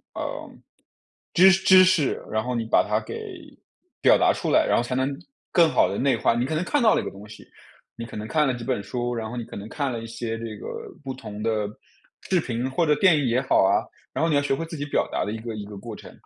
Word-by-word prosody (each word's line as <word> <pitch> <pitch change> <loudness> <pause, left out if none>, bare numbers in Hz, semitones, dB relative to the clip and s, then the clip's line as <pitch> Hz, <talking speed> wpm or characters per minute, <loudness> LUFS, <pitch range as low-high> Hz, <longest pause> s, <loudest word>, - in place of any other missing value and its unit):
呃， - - -5 0.8
知 185 +2 +7
知 190 0 +6
识， 165 -6 +1
然 110 0 -1
后 125 +1 -3
你 115 -1 -2
把 110 - +3
它 105 +1 +1
给 110 - -8 0.6
表 - - +6
达 - - +3
出 - - -3
来， - - +4
然 - - +3
后 - - +2
才 125 +1 -3
能 135 +2 -1 0.3
更 170 -3 +5
好 - - +4
地 - - -3
内 135 -3 +2
化。 - - +2
你 120 +1 0
可 155 - -2
能 160 - 0
看 290 +6 +1
到 220 - +6
了 - - +1
一 - - -8
个 - - -4
东 100 +2 -12
西， 110 - -13 0.5
你 115 - -6
可 115 - -9
能 105 +1 -5
看 155 +4 +2
了 130 - +1
几 120 -1 -7
本 125 -6 -1
书， 120 +3 -3
然 110 -1 -4
后 120 - -6
你 120 - -4
可 - - -11
能 100 +2 -7
看 140 -1 -2
了 115 - -4
一 - - -7
些 115 0 -4
这 115 -2 -6
个 - - -8 0.4
不 135 -2 -4
同 105 -4 -9
的 110 -2 0 0.6
视 185 -3 +3
频 125 -1 -3
或 150 +6 +1
者 150 - +4
电 185 +1 +5
影 145 - 0
也 120 +2 +2
好 130 - +3
啊， 95 +1 +3 0.3
然 - - -1
后 165 - +2
你 150 - +2
要 145 - +3
学 140 -1 0
会 165 - -4
自 165 0 -8
己 145 - -3
表 145 - 0
达 - - -1
的 105 - -3
一 - - -4
个 115 0 -6
一 105 -1 -6
个 105 0 -10
过 115 +3 -8
程。 - - -12
120 Hz, 300 characters per minute, -24 LUFS, 110-150 Hz, 0.8 s, 知